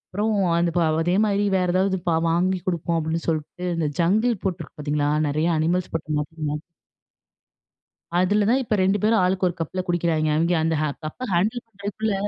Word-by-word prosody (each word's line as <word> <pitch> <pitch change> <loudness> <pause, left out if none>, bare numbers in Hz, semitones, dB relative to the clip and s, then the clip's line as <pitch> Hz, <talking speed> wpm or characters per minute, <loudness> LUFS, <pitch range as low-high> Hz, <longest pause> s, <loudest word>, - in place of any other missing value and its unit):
அப்பறம், 215 +1 +1 0.2
"அந்த 170 0 +1
பே 175 - +3 0.2
அதேமாரி 200 +4 +2
வேற 180 - +1
ஏதாவது 190 +1 +2
ப 170 - +3 0.2
வாங்கி 180 +3 +1
குடுப்போம்." 170 -1 0
அப்பிடின்னு 160 +1 -2
சொல்ட்டு, 160 +3 -3
இந்த 165 -2 0
ஜங்கிள் 215 +5 +2
போட்டிருக்கு 175 -5 -4
பார்த்தீங்களா! 145 0 0 0.2
நெறைய 155 +3 0
அனிமல்ஸ் 175 +3 0
போட்டு 155 -1 -2
மக் 150 - -4 0.2
மக் 150 +1 -3 1.6
அதுல 205 +3 +2
தான் 260 - +3
இப்ப 220 -3 -1
2 195 +2 +2
பேரும் 220 0 +3
ஆளுக்கு 185 0 +1
ஒரு 175 - -5
கப்ல 165 +3 -3
குடிக்கிறாய்ங்க. 165 -3 +1
அவெங்க 170 +2 +2
அந்த 160 0 +1
ஹ - - +1 0.2
கப்ப 240 +11 -5
ஹேண்டில் 215 +8 +1
பண்ணுறதுக்குள்ள, 205 0 -3
180 Hz, 170 wpm, -23 LUFS, 165-200 Hz, 1.6 s, பே